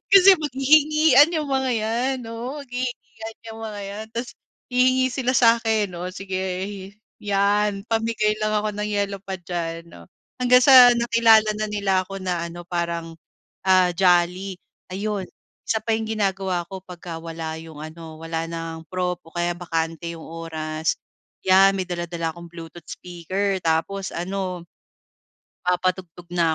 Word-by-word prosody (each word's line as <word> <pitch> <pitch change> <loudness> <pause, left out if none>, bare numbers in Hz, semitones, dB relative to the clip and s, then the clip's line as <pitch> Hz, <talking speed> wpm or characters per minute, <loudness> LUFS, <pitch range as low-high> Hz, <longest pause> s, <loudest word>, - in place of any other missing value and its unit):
Kasi, 390 0 +9
maghihingian 295 +1 +5
yung 305 -3 -1
mga 265 -1 +1
'yan. 235 +4 0
Oo, 250 +6 -5
maghihingian 245 -3 -6
'yang 225 0 -9
mga 215 -2 -6
yan. 205 +2 -6
Tapos, 235 +1 -3 0.4
hihingi 255 +1 +4
sila 255 -1 0
sa'kin. 225 -4 +3
O 180 +1 -4
sige 190 -1 -4 0.8
'yan 205 0 +1
pamigay 225 -1 +1
lang 215 0 0
ako 210 0 -1
ng 210 0 -2
yellow 200 -1 -1
pad 190 -2 -6
diyan. 170 -1 -4
O, 85 -1 -14 0.4
hanggang 250 0 +6
sa 255 -3 +9
nakilala 230 -2 +5
na 215 0 -1
nila 200 -2 0
ako 195 - -7
na 175 -2 -2
ano 175 +1 -9
parang, 170 -1 -2 0.5
ah, 185 -1 +5
jolly. 180 +1 +2 0.4
Ayun, 200 -1 -2 0.4
isa 220 - +2
pa 225 - 0
yung 220 0 -4
ginagawa 195 -4 -1
ko 190 -1 -7
'pagka 175 -2 -8
wala 160 -1 -5
yung 160 -1 -11
ano, 160 0 -9
walang 165 0 -5
prof 180 -1 -1
o 165 - -16
kaya 175 0 0
bakante 165 -1 -3
yung 165 - -10
oras, 160 -1 -3 0.5
'yan 195 +1 +6
may 185 - -1
dala-dala 170 -2 -3
akong 170 0 -11
Bluetooth 165 0 -11
speaker, 185 +3 -3
tapos 170 +4 0
ano 180 0 -3 1.0
papatugtog 180 -1 -1
na 165 -2 +2
195 Hz, 140 wpm, -23 LUFS, 170-225 Hz, 1.0 s, Kasi